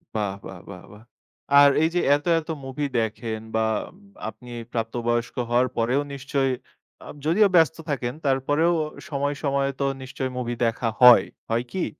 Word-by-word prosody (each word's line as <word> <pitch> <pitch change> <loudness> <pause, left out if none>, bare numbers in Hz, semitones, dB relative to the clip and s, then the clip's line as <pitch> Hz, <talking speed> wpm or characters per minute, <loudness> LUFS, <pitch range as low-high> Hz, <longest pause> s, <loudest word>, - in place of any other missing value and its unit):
বাহ! 105 -3 -1
বাহ! 95 -2 -9
বাহ! 90 -2 -10
বাহ! 105 +2 -15 0.6
আর 145 - +8
এই 160 - +3
যে, - - +3 0.2
এত, 145 - -5
এত 160 - -12 0.2
মুভি 135 +2 -3
দেখেন 110 0 -3 0.2
বা 110 0 +2 0.6
আপনি 120 +3 -13 0.2
প্রাপ্ত 115 -1 -3
বয়স্ক 120 0 0
হওয়ার 125 +1 +3
পরেও 125 +5 +2
নিশ্চয়ই, 135 -1 -1 0.5
আ - - -11 0.2
যদিও 200 +7 +4
ব্যস্ত 160 -1 +4
থাকেন, 125 -4 -2
তারপরেও 145 +5 +2 0.4
সময়ে, 145 0 -1
সময়ে 140 -1 +1
তো - - +2 0.2
নিশ্চয়ই 130 0 -4
মুভি 120 -1 -2
দেখা 115 0 0
হয়। 125 -1 +9 0.2
হয় 115 +2 +1
কি? 190 - -1
130 Hz, 160 wpm, -24 LUFS, 115-145 Hz, 0.6 s, হয়